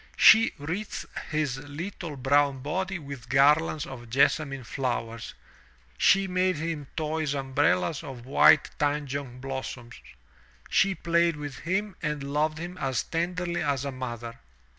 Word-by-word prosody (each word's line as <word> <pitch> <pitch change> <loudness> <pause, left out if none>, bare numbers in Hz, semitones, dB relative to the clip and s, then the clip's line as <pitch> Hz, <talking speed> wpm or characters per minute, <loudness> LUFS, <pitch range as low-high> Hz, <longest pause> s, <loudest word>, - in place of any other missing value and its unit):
She 225 +1 +8
wreathed 175 +9 -4 0.2
his 150 -5 -1
Uttle 155 +2 -6
brown 135 0 +2
body 190 +5 -2
with 140 -6 -9
garlands 150 +3 +4
of 120 -3 -9
jessamine 135 +2 +2
flowers; 115 -2 -3 0.6
she 195 - +4
made 185 0 +1
him 155 -2 -4
toy 160 0 -1
umbrellas 135 -10 +1
of 125 -3 -8
white 135 - +5
tanjong 140 -3 -2
blossoms; 130 -3 -6 0.7
she 195 -1 +3
played 170 0 +2
with 145 -2 -7
him 190 +3 -2
and 150 -3 -2
loved 155 +1 +1
him 175 +2 -7
as 130 -3 0
tenderly 175 +1 -2
as 140 -1 0
a 140 - -2
mother. 120 -3 -6
145 Hz, 130 wpm, -27 LUFS, 135-165 Hz, 0.7 s, She